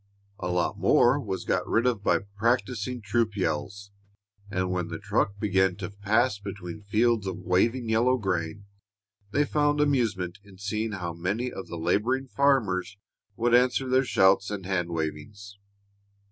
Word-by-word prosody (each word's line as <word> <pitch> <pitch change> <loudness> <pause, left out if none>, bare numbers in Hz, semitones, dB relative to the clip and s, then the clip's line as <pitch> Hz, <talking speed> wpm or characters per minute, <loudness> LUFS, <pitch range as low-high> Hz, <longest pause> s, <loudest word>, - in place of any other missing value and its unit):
A 90 - -3
lot 90 -1 -1
more 125 +4 +4
was 100 -8 -4
got 90 - 0
rid 115 +2 +2
of 115 -5 0
by 85 -2 +2
practising 120 +2 0
troop 110 +1 0
yells, 100 +4 -3 0.6
and 95 -2 -1
when 90 -2 -1
the - - -5
truck 100 +1 -1
began 95 -3 +2
to 100 0 -6
pass 105 +3 +1
between 100 -1 -7
fields 110 0 +1
of 95 - -3
waving 115 +7 +1
yellow 120 +4 +3
grain, 95 -2 -3 0.6
they 145 +8 +2
found 145 0 +1
amusement 110 -11 0
in 100 -2 -16
seeing 105 +2 -3
how 90 -3 -4
many 100 +9 -2
of 95 - -7
the 85 - -6
laboring 105 +11 0
farmers 110 -9 +1 0.4
would 120 +2 +1
answer 125 +2 +3
their 130 +1 +3
shouts 95 -5 +3
and 100 -3 -5
hand 90 -3 -1
wavings. 85 +6 -5
100 Hz, 155 wpm, -27 LUFS, 95-120 Hz, 0.6 s, more